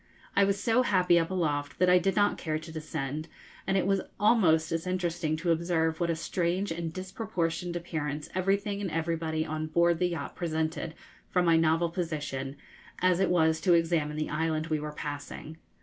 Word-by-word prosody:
I 200 Hz, -, +5 dB
was 200 Hz, 0 st, 0 dB
so 230 Hz, +4 st, +3 dB
happy 180 Hz, -7 st, +4 dB
up 165 Hz, -, -1 dB
aloft 145 Hz, -6 st, -1 dB
that 185 Hz, -, +3 dB
I 180 Hz, 0 st, +6 dB
did 195 Hz, +1 st, 0 dB
not 205 Hz, 0 st, +2 dB
care 155 Hz, -2 st, -1 dB
to 160 Hz, +1 st, -9 dB
descend; 155 Hz, -1 st, -4 dB, 0.4 s
and 195 Hz, -, +2 dB
it 185 Hz, -, +1 dB
was 195 Hz, 0 st, +2 dB, 0.2 s
almost 175 Hz, -8 st, +4 dB
as 165 Hz, +2 st, -2 dB
interesting 175 Hz, -3 st, -1 dB
to 170 Hz, +2 st, 0 dB
observe 165 Hz, -1 st, +1 dB
what 170 Hz, -1 st, 0 dB
a 165 Hz, -, +1 dB
strange 175 Hz, +3 st, -1 dB
and 165 Hz, 0 st, -3 dB
disproportioned 175 Hz, -2 st, -3 dB
appearance 155 Hz, -4 st, -3 dB
everything 200 Hz, +2 st, 0 dB
and 195 Hz, -, -2 dB
everybody 160 Hz, -1 st, -1 dB
on 155 Hz, 0 st, -3 dB
board 170 Hz, +1 st, +3 dB
the 180 Hz, -1 st, +2 dB
yacht 160 Hz, -5 st, -5 dB
presented 160 Hz, -1 st, -2 dB, 0.3 s
from 180 Hz, -1 st, +2 dB
my 165 Hz, -1 st, +5 dB
novel 165 Hz, +1 st, +3 dB
position, 150 Hz, -6 st, -3 dB, 0.4 s
as 180 Hz, -1 st, +3 dB
it 195 Hz, -, +2 dB
was 160 Hz, -2 st, +3 dB
to 180 Hz, -, +4 dB
examine 165 Hz, -3 st, +1 dB
the 155 Hz, -, -2 dB
island 155 Hz, 0 st, 0 dB
we 155 Hz, -, +1 dB
were 150 Hz, 0 st, -5 dB
passing. 150 Hz, +1 st, -6 dB
165 Hz, 185 wpm, -29 LUFS, 155-180 Hz, 0.4 s, I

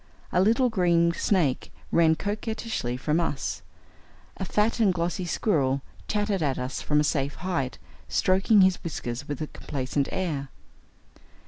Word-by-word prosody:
A 180 Hz, -, +3 dB
little 230 Hz, +6 st, +4 dB
green 170 Hz, -4 st, +3 dB
snake 165 Hz, -9 st, +1 dB, 0.2 s
ran 160 Hz, -1 st, +4 dB
coquettishly 210 Hz, -, -3 dB
from 150 Hz, +5 st, 0 dB
us. 145 Hz, -5 st, -2 dB, 0.8 s
A 190 Hz, -, -3 dB
fat 210 Hz, +5 st, +1 dB
and 210 Hz, -4 st, +4 dB
glossy 175 Hz, +1 st, -2 dB
squirrel 140 Hz, -8 st, +1 dB, 0.2 s
chattered 205 Hz, -3 st, 0 dB
at 140 Hz, -4 st, 0 dB
us 125 Hz, +1 st, -3 dB
from 150 Hz, 0 st, +2 dB
a -, -, +3 dB
safe 140 Hz, -2 st, 0 dB
height, 165 Hz, -9 st, -2 dB, 0.3 s
stroking 195 Hz, +3 st, +4 dB
his 185 Hz, -1 st, +3 dB
whiskers 135 Hz, -5 st, -4 dB
with 145 Hz, -1 st, -4 dB
a -, -, 0 dB
complaisant 140 Hz, 0 st, -3 dB
air. 150 Hz, -7 st, -2 dB
170 Hz, 140 wpm, -26 LUFS, 140-195 Hz, 0.8 s, little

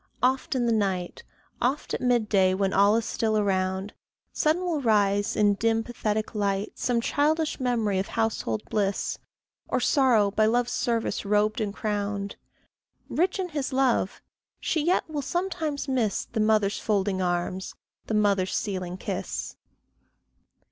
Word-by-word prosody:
Oft 260 Hz, +1 st, +1 dB
in 245 Hz, -2 st, +1 dB
the 235 Hz, -, +2 dB
night, 195 Hz, -5 st, -1 dB, 0.4 s
Oft 265 Hz, +5 st, 0 dB
at -, -, -2 dB
mid 245 Hz, -3 st, +2 dB
day 190 Hz, -3 st, +3 dB
when 195 Hz, 0 st, 0 dB
all 200 Hz, +2 st, +5 dB
is 230 Hz, 0 st, 0 dB
still 220 Hz, -1 st, 0 dB
around, 190 Hz, -1 st, 0 dB, 0.4 s
Sudden 315 Hz, +4 st, +1 dB
will 335 Hz, -5 st, -1 dB
rise, 205 Hz, -1 st, +2 dB
in 205 Hz, -1 st, +4 dB
dim 225 Hz, +2 st, +1 dB
pathetic 220 Hz, -2 st, -2 dB
light, 200 Hz, -1 st, -1 dB
Some 240 Hz, -2 st, +1 dB
childish 305 Hz, +5 st, +1 dB
memory 230 Hz, -6 st, +1 dB
of 195 Hz, -, -2 dB
household 220 Hz, -, -1 dB
bliss, 200 Hz, -2 st, -1 dB, 0.5 s
Or -, -, 0 dB
sorrow 240 Hz, -8 st, +3 dB
by 215 Hz, +1 st, +3 dB
love's 240 Hz, +2 st, +1 dB
service 230 Hz, -2 st, -1 dB
robed 210 Hz, +2 st, +1 dB
and 210 Hz, -2 st, -1 dB
crowned; 205 Hz, -1 st, -3 dB, 0.7 s
Rich 365 Hz, +4 st, +1 dB
in 375 Hz, -2 st, -2 dB
his 290 Hz, -4 st, -3 dB
love, 260 Hz, -7 st, +1 dB, 0.4 s
she 315 Hz, -, 0 dB
yet 350 Hz, +4 st, +2 dB
will 305 Hz, -2 st, -3 dB
sometimes 325 Hz, -3 st, -2 dB
miss 245 Hz, -7 st, 0 dB
The 225 Hz, -, -4 dB
mother's 215 Hz, -2 st, +2 dB
folding 200 Hz, -3 st, 0 dB
arms, 180 Hz, +1 st, -2 dB, 0.3 s
the 220 Hz, -, -1 dB
mother's 200 Hz, -3 st, +2 dB
sealing 185 Hz, -3 st, -3 dB
kiss. 190 Hz, -1 st, -4 dB
215 Hz, 150 wpm, -26 LUFS, 200-250 Hz, 0.7 s, all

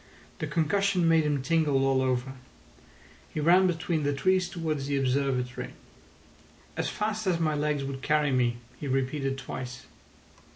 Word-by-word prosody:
The -, -, -2 dB
concussion 185 Hz, +2 st, +1 dB
made 165 Hz, -1 st, +4 dB
him 145 Hz, -3 st, 0 dB
tingle 150 Hz, -4 st, +2 dB
all 135 Hz, -1 st, +3 dB
over. 130 Hz, 0 st, -1 dB, 1.0 s
He -, -, -4 dB
ran 180 Hz, +5 st, +5 dB
between 165 Hz, -2 st, -1 dB
the 145 Hz, 0 st, 0 dB
trees 185 Hz, +5 st, +2 dB
towards 155 Hz, -6 st, -3 dB
the 140 Hz, -1 st, 0 dB
Observatory. 130 Hz, -1 st, -1 dB, 1.0 s
"As -, -, -1 dB
fast 215 Hz, 0 st, -2 dB
as 175 Hz, -3 st, +2 dB
my 155 Hz, -2 st, +1 dB
legs 150 Hz, -1 st, 0 dB
would 135 Hz, -1 st, -5 dB
carry 150 Hz, -1 st, +2 dB
me," 120 Hz, -2 st, +1 dB, 0.2 s
he 145 Hz, -, -5 dB
repeated 135 Hz, +1 st, -1 dB
twice. 125 Hz, -2 st, -7 dB
145 Hz, 150 wpm, -28 LUFS, 135-165 Hz, 1.0 s, ran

